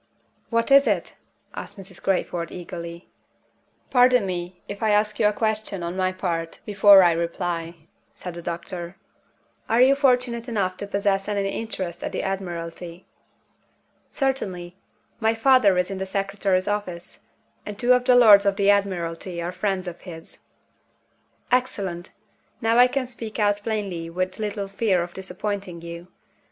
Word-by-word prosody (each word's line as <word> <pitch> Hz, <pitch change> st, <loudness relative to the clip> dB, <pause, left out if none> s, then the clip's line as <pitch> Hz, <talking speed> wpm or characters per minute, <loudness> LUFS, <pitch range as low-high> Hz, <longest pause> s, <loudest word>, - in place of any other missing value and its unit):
"What 230 Hz, +3 st, 0 dB
is 275 Hz, +1 st, +7 dB
it?" -, -, 0 dB, 0.4 s
asked -, -, -8 dB
Mrs. 190 Hz, -1 st, -12 dB
Crayford, 175 Hz, -3 st, -1 dB
eagerly. 170 Hz, -1 st, -8 dB, 0.8 s
"Pardon 250 Hz, -3 st, +5 dB
me 180 Hz, -1 st, -4 dB
if 200 Hz, 0 st, -7 dB
I 220 Hz, -, +2 dB
ask 210 Hz, 0 st, +2 dB
you 215 Hz, -, +5 dB
a -, -, +3 dB
question, 215 Hz, -3 st, -2 dB
on 170 Hz, +1 st, -4 dB
my 185 Hz, 0 st, +1 dB
part, 165 Hz, -3 st, -3 dB
before 200 Hz, -1 st, +7 dB
I 175 Hz, -, +5 dB
reply," 170 Hz, 0 st, -3 dB, 0.4 s
said 180 Hz, -, -8 dB
the 170 Hz, -, -8 dB
doctor. 170 Hz, +1 st, -6 dB, 0.7 s
"Are 230 Hz, -, +3 dB
you 260 Hz, +2 st, +7 dB
fortunate 250 Hz, -3 st, +1 dB
enough 195 Hz, -5 st, -1 dB
to 200 Hz, -, -5 dB
possess 200 Hz, -1 st, 0 dB
any 200 Hz, -1 st, -1 dB
interest 185 Hz, -5 st, -4 dB
at -, -, -4 dB
the -, -, -2 dB
Admiralty?" 175 Hz, -2 st, -5 dB, 1.0 s
"Certainly. 185 Hz, -11 st, -2 dB, 0.4 s
My 225 Hz, 0 st, +2 dB
father 225 Hz, -5 st, +4 dB
is 180 Hz, +2 st, 0 dB
in 195 Hz, -, -4 dB
the 190 Hz, -, -3 dB
Secretary's 195 Hz, -1 st, 0 dB
office; 185 Hz, -4 st, -4 dB, 0.4 s
and 210 Hz, -1 st, -7 dB
two 245 Hz, +2 st, +4 dB
of 250 Hz, 0 st, +2 dB
the 250 Hz, -, +5 dB
Lords 210 Hz, -5 st, +8 dB
of 200 Hz, -, +2 dB
the 200 Hz, 0 st, +4 dB
Admiralty 180 Hz, -3 st, -1 dB
are 170 Hz, +1 st, -3 dB
friends 185 Hz, 0 st, -2 dB
of 175 Hz, 0 st, -7 dB
his." 165 Hz, -3 st, -11 dB, 1.1 s
"Excellent! 195 Hz, -9 st, -1 dB, 0.5 s
Now 225 Hz, +1 st, +2 dB
I 250 Hz, -, +8 dB
can 260 Hz, +1 st, -2 dB
speak 230 Hz, -3 st, -7 dB
out 205 Hz, -1 st, +2 dB
plainly 200 Hz, -7 st, -3 dB
with 185 Hz, +3 st, -3 dB
little 205 Hz, -2 st, -3 dB
fear 195 Hz, -3 st, +1 dB
of 175 Hz, 0 st, -9 dB
disappointing 190 Hz, -1 st, -5 dB
you. 170 Hz, +1 st, -8 dB
195 Hz, 155 wpm, -24 LUFS, 175-215 Hz, 1.1 s, Lords